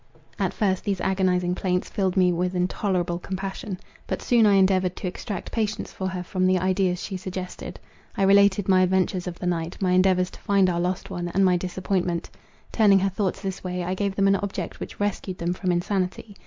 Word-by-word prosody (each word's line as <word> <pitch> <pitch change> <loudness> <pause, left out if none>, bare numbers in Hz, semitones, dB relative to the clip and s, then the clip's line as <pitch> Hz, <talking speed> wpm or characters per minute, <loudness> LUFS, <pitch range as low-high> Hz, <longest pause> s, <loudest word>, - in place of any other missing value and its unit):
At - - +1
first 190 -4 0
these 200 -3 -1
agonizing 180 -1 +1
plaints 180 0 -1
filled 190 -2 -1
me 180 -1 +5
with 180 +2 -1
intolerable 180 -1 0
compassion. 190 +2 -5 0.3
But - - -3
soon 235 -3 +4
I 205 - +5
endeavoured 190 -1 +3
to - - -7
extract 200 +3 -5
patience 220 -2 -2
for 190 - -3
her 185 -1 -4
from 185 +1 0
the 185 0 +3
ideas 185 0 0
she 190 - -4
suggested. 185 -1 -6 0.4
I 195 - +2
related 200 0 +5
my 185 -1 +5
adventures 185 0 +1
of 175 -1 -5
the - - -6
night, 170 -1 -2
my 185 -2 +1
endeavours 185 0 +3
to - - -13
find 195 -2 +3
our 170 - -1
lost 180 +2 -2
one, 175 -2 -3
and 190 +3 +2
my 180 -1 +4
disappointment. 180 -1 -2 0.4
Turning 205 -3 +5
her 195 +1 +2
thoughts 190 0 -2
this 190 -1 -4
way, 180 -1 -3
I 180 +1 -2
gave 195 0 -2
them 195 0 +3
an 195 0 +4
object 195 -4 -5
which - - -8
rescued 200 -2 -2
them 170 +1 -1
from 185 0 -1
insanity. 185 +3 -2
185 Hz, 205 wpm, -25 LUFS, 180-195 Hz, 0.4 s, me